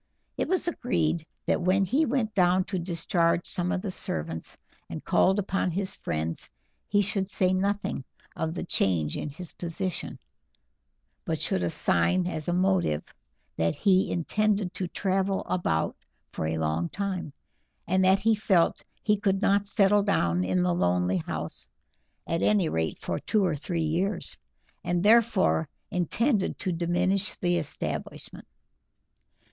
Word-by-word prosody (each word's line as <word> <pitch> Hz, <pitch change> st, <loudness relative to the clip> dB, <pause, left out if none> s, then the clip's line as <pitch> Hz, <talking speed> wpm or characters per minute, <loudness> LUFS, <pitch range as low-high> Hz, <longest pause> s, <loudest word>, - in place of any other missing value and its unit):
It -, -, -1 dB
was 370 Hz, -1 st, 0 dB
agreed 165 Hz, -, 0 dB, 0.2 s
that -, -, +1 dB
when 190 Hz, +2 st, +3 dB
he 280 Hz, -, +2 dB
went 235 Hz, -4 st, 0 dB
down 185 Hz, -1 st, +3 dB
to 190 Hz, 0 st, -3 dB
discharge 170 Hz, 0 st, +1 dB
some 180 Hz, 0 st, -1 dB
of 190 Hz, -2 st, -1 dB
the 200 Hz, -, -2 dB
servants 80 Hz, -, -4 dB, 0.3 s
and -, -, -6 dB
called 190 Hz, +2 st, +3 dB
upon 195 Hz, -2 st, 0 dB
his 190 Hz, +2 st, -1 dB
friends 80 Hz, +1 st, -3 dB, 0.4 s
he 205 Hz, 0 st, +3 dB
should 195 Hz, -1 st, -1 dB
say 185 Hz, -1 st, +1 dB
nothing 200 Hz, -5 st, -1 dB, 0.3 s
of 160 Hz, +1 st, -2 dB
the -, -, -3 dB
change 85 Hz, -, 0 dB
in 150 Hz, -, -3 dB
his 160 Hz, +4 st, -8 dB
position, 180 Hz, +1 st, -4 dB, 1.1 s
but -, -, -2 dB
should -, -, 0 dB
assign 90 Hz, -, +2 dB
as 160 Hz, -4 st, -4 dB
a -, -, +1 dB
motive 180 Hz, -, +1 dB, 0.5 s
that 80 Hz, 0 st, +1 dB
he 190 Hz, -2 st, +3 dB
intended 200 Hz, +2 st, 0 dB
to 185 Hz, -1 st, -2 dB
travel 190 Hz, +2 st, 0 dB
about 125 Hz, -, 0 dB, 0.4 s
for 80 Hz, -, -3 dB
a 80 Hz, 0 st, -1 dB
long 80 Hz, +2 st, -1 dB
time, 195 Hz, -6 st, -3 dB, 0.6 s
and 190 Hz, +2 st, +2 dB
that 190 Hz, +1 st, +5 dB
he 220 Hz, +3 st, +3 dB
felt 195 Hz, -5 st, +2 dB, 0.2 s
he 210 Hz, -2 st, +2 dB
could 195 Hz, -2 st, +1 dB
not 200 Hz, 0 st, +2 dB
settle 205 Hz, 0 st, +4 dB
down 90 Hz, -, +1 dB
in 90 Hz, -1 st, +1 dB
the 90 Hz, -1 st, +2 dB
lonely 90 Hz, +1 st, +1 dB
house, 80 Hz, -1 st, -3 dB, 0.6 s
at 165 Hz, 0 st, -1 dB
any 205 Hz, -5 st, +3 dB
rate 80 Hz, 0 st, -1 dB
for -, -, -3 dB
two 210 Hz, -3 st, +1 dB
or 170 Hz, -4 st, +1 dB
three 165 Hz, +3 st, -2 dB
years; 180 Hz, +6 st, -1 dB, 0.5 s
and 175 Hz, 0 st, 0 dB
therefore 215 Hz, -8 st, +4 dB, 0.2 s
intended 205 Hz, -, +1 dB
to 185 Hz, -, -2 dB
diminish 180 Hz, +4 st, +1 dB
the 175 Hz, -1 st, +1 dB
establishment. 155 Hz, -3 st, -4 dB
180 Hz, 150 wpm, -27 LUFS, 155-195 Hz, 1.1 s, that